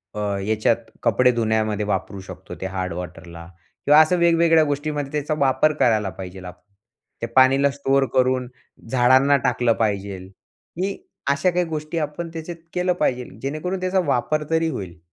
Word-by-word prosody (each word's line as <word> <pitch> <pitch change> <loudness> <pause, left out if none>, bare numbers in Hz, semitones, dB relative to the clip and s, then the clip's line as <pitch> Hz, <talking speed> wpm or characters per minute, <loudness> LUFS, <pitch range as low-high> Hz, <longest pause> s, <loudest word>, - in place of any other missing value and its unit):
अ, - - -4 0.3
याच्यात 110 +2 +2 0.3
कपडे 125 +2 +4
धुण्यामध्ये 110 -2 0
वापरू 95 0 -2
शकतो 95 -1 -10
ते - - -3
हार्ड 95 -2 -4
वॉटरला 85 -1 -8 0.4
किंवा 150 +2 +7
असं 165 +3 +3
वेगवेगळ्या 165 -1 +4
गोष्टीमध्ये 145 -1 -3
त्याचा 150 +1 -2
वापर 140 +3 +3
करायला 110 -4 +3
पाहिजे. 95 +1 -9 0.8
ते - - -1
पाणीला 135 +2 +5
स्टोअर 135 -1 +1
करून 130 -1 +2 0.4
झाडांना 130 +3 +4
टाकलं 120 -2 +2
पाहिजे. 100 -2 -1
ही 165 - -8 0.3
अशा 140 +6 +2
काही 180 0 0
गोष्टी 155 0 -5
आपण 155 +3 -4
त्याच्यात 165 +1 -6 0.2
केलं 180 0 +1
पाहिजे, 125 -7 -1 0.2
जेणेकरून 155 +7 -3
त्याचा 185 +1 +1
वापर 150 +5 0
तरी 165 0 +2
होईल. 95 - -6
130 Hz, 145 wpm, -22 LUFS, 105-155 Hz, 0.8 s, किंवा